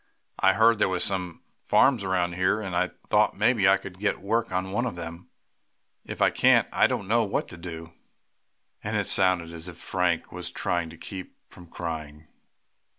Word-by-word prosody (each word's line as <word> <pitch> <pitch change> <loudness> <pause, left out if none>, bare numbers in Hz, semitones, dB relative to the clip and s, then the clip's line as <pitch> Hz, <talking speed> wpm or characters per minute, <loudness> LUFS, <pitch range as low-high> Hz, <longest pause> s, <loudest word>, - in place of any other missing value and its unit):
I 95 - +4
heard 115 +1 +4
there - - +3
were 90 -1 -1
some 90 -2 -1 0.2
farms 125 -7 +3
around 90 -2 0
here, 95 +4 +1
and 95 -4 -5
I 90 +1 +1 0.2
thought - - +3
maybe 105 -2 +3
I 95 - +5
could 95 -1 -10
get 100 0 0
work 115 +3 -1
on 95 +1 -2
one 120 +5 0
of 115 - -5
them. 85 +1 -8 0.7
If - - -3
I - - +4
can't - - +4
I - - +4
don't 100 - -3
know 115 +2 +3
what 100 - -2
to 85 - -10
do," 85 -1 -8 0.9
and - - -2
it - - 0
sounded 90 -3 +3
as 85 +1 -8
if 85 -2 -9
Frank 90 -2 -1
was - - -6
trying 85 -2 -2
to 80 - -12
keep 95 +2 -9 0.2
from 90 - -14
crying. 80 -3 -7
90 Hz, 190 wpm, -26 LUFS, 85-100 Hz, 0.9 s, I